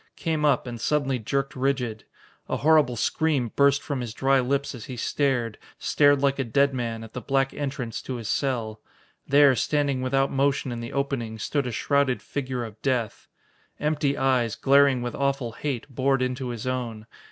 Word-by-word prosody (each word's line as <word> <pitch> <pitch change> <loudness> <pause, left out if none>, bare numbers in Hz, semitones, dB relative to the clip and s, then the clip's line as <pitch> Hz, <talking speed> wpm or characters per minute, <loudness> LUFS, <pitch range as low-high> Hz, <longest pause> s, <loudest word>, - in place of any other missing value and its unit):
Came 160 -2 -1
up 140 -4 +3
and 120 -2 -6
suddenly 135 -2 0
jerked 135 +5 -2
rigid. 125 -4 -1 0.4
A - - 0
horrible 150 -5 +4
scream 130 0 0
burst 140 0 +4
from 140 -3 -3
his 115 -2 -6
dry 135 0 +3
lips 140 +3 -1
as 120 -4 -8
he 130 - -7
stared 120 -3 0 0.2
stared 145 -1 +3
like 140 0 +2
a - - +2
dead 140 +4 +2
man 115 -3 -3
at 110 - -12
the 125 - -5
black 135 0 0
entrance 135 -5 -4
to 130 - -5
his 115 -3 -6
cell. 115 -6 -1 0.5
There, 140 -1 +6
standing 140 +1 0
without 135 +1 +1
motion 135 -1 +1
in 120 - -4
the 115 0 -6
opening, 135 -5 -2
stood 140 +4 -1
a - - -3
shrouded 140 +2 +1
figure 130 -3 -3
of 110 -1 -11
death. 125 -5 -1 0.5
Empty 150 -2 0
eyes, 125 -4 +1
glaring 140 -2 +4
with 120 - -3
awful 140 -3 -1
hate, 130 0 -4
bored 135 0 +1
into 125 0 -2
his 120 -2 -5
own. 120 -4 -3
135 Hz, 180 wpm, -25 LUFS, 120-140 Hz, 0.5 s, There